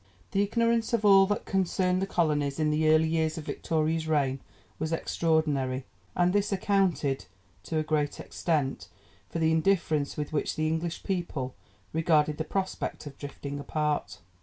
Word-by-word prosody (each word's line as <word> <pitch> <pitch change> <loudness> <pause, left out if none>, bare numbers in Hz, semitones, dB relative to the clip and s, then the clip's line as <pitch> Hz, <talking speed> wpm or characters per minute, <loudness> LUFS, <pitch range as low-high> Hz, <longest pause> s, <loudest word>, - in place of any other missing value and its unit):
The 195 - +2
ignorance 230 +2 +1
of 220 -2 +1
all 195 -1 +7
that 205 +1 -1
concerned 185 -1 +1
the 195 - -1
colonies 150 -5 0
in 155 -1 +2
the 155 +1 +2
early 155 +1 +5
years 160 0 0
of 160 - -5
Victoria's 160 0 -1
reign 140 -4 +1 0.4
was 155 +1 -2
extraordinary, 150 -6 0 0.3
and 175 +1 +3
this 205 0 +1
accounted, 185 - +1 0.4
to 160 - -2
a 155 - +1
great 150 -2 -1
extent, 150 -6 -1 0.4
for - - -4
the 160 -1 +2
indifference 160 -4 +1
with 150 0 -4
which 150 - -1
the 155 0 0
English 160 +1 -2
people 170 -9 -2 0.4
regarded 155 -2 +2
the - - +1
prospect 190 -2 -3
of 140 -2 -10
drifting 145 0 -6
apart. 150 +1 -1
160 Hz, 160 wpm, -28 LUFS, 150-180 Hz, 0.4 s, all